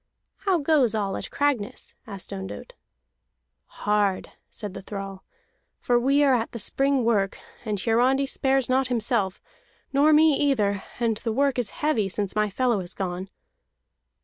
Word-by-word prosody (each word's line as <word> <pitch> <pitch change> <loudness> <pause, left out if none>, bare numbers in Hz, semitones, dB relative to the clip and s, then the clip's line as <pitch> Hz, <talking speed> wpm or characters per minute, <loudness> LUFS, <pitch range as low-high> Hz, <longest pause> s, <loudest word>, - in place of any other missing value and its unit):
"How 385 -3 +1
goes 280 -7 +2
all 200 -2 -1
at - - -5
Cragness?" 280 -8 -1
asked 200 -3 -6
Ondott. 95 +1 -7 0.9
"Hard," 205 -2 0 0.2
said 210 -4 -5
the - - -7
thrall, 195 -1 -7 0.6
"for 245 -1 +2
we 275 +4 +3
are 275 -2 +4
at 235 -2 -1
the - - -4
spring 270 +3 +1
work; 200 -4 +1 0.3
and 210 -2 -2
Hiarandi 250 +6 +2
spares 270 -1 +1
not 260 +1 +2
himself, 230 -5 0 0.5
nor 290 +3 +5
me 310 0 +6
either, 215 -9 +1 0.2
and 230 -3 +1
the 230 +1 -3
work 275 +2 +1
is 235 -5 -1 0.2
heavy 225 -10 +2
since 200 +1 -2
my 210 0 +2
fellow 240 +1 +1
is 180 -1 -6
gone." 185 0 -4
230 Hz, 150 wpm, -25 LUFS, 200-270 Hz, 0.9 s, me